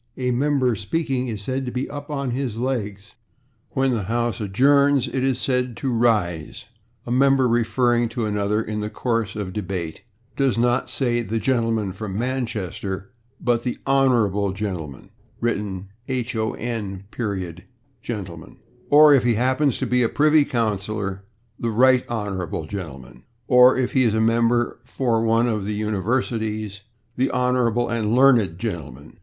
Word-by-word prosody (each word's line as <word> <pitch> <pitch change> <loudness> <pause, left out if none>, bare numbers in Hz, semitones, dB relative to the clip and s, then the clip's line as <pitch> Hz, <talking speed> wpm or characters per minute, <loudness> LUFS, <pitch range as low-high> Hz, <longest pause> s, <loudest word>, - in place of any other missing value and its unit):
A 125 -1 0
member 130 -1 +2
speaking 130 - -2
is 105 -4 -5
said 130 +4 -2
to - - -3
be 125 +2 -2
/up/ 145 0 -8
or 140 -2 -2
/on 125 - -2
his 125 -3 -3
legs/. 105 -6 -3 0.6
When 135 -1 +2
the 110 -6 -1
house 120 +2 -1
adjourns 140 +6 +3
it 130 +1 -2
is 135 -2 +1
said 125 -2 -1
to 135 - -2
/rise/. 105 -9 0 0.4
A 120 - -5
member 135 0 +4
referring 120 0 +2
to 115 0 -3
another 105 +1 0
in 105 0 -4
the 105 0 -3
course 115 -3 -2
of 105 -3 -4
a - - -8
debate 90 -5 -4 0.3
does 135 -4 +1
not 120 +2 +1
say 120 -3 +1
"the 115 0 -3
gentleman 115 -4 0
from 100 -1 -5
Manchester," 110 -5 -3 0.3
but 120 -1 +1
"the 125 - -2
/honorable/ 115 -8 +2
gentleman" 90 -10 -5 0.3
(written 100 -5 -2 0.2
/hon. 110 -6 -3 0.4
gentleman/) 95 -9 -7 0.3
or, 150 0 +8
if 135 - +4
he 120 -2 +2
happens 130 +3 +1
to - - -2
be 125 0 +2
a 115 - +2
privy 150 0 +4
councillor, 105 -4 -2 0.4
"the 115 - -2
/right 125 +3 +4
honorable/ 95 -8 -3
gentleman," 70 -10 -8 0.3
or, 125 +1 +6
if 130 -2 0
he 130 - +3
is 115 -4 +2
a - - +1
member 115 +2 +2
for 120 -3 0
one 115 +1 +3
of 110 -4 -1
the 105 +1 -3
universities, 110 -1 -2 0.4
"the 130 +2 +2
/honorable 125 -2 +1
and 115 -1 0
learned/ 120 -10 +4
gentleman." 80 - -6
115 Hz, 155 wpm, -22 LUFS, 100-125 Hz, 0.6 s, or